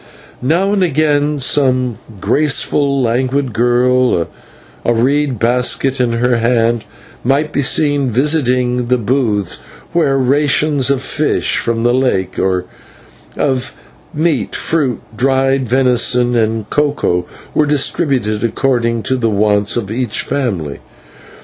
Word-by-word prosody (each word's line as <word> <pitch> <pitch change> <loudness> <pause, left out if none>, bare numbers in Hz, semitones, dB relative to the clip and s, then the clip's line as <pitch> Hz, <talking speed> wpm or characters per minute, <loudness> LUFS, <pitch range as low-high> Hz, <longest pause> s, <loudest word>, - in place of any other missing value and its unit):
Now 175 +10 +1
and 200 - +1
again 150 -3 +1
some 130 -3 +1 0.2
graceful, 140 +3 +1
languid 130 +2 0
girl, 125 -4 +2 0.6
a 120 - +2
reed 135 +2 +1
basket 125 +3 +1
in 120 -2 0
her 120 +1 +1
hand, 115 -1 +1 0.4
might 145 +4 0
be 145 - +1
seen 145 0 +1
visiting 125 -2 +1
the 125 +1 +2
booths, 110 -5 -1 0.4
where 150 -5 +2
rations 140 +1 +1
of 135 -1 0
fish 155 0 0
from 115 -1 -1
the 120 0 +2
lake, 110 -8 0
or 95 -1 0 0.7
of 130 -1 -1 0.4
meal, 150 -8 0
fruit, 145 -8 -1
dried 135 +1 +1
venison, 125 -1 +2
and 110 -2 0
cocoa, 140 -12 0 0.3
were 150 - +2
distributed 130 -7 0
according 115 -1 0
to 130 - -1
the 115 -2 0
wants 105 0 +1
of 105 -4 -3
each 120 -2 -1
family. 95 - -3
125 Hz, 120 wpm, -15 LUFS, 115-140 Hz, 0.7 s, girl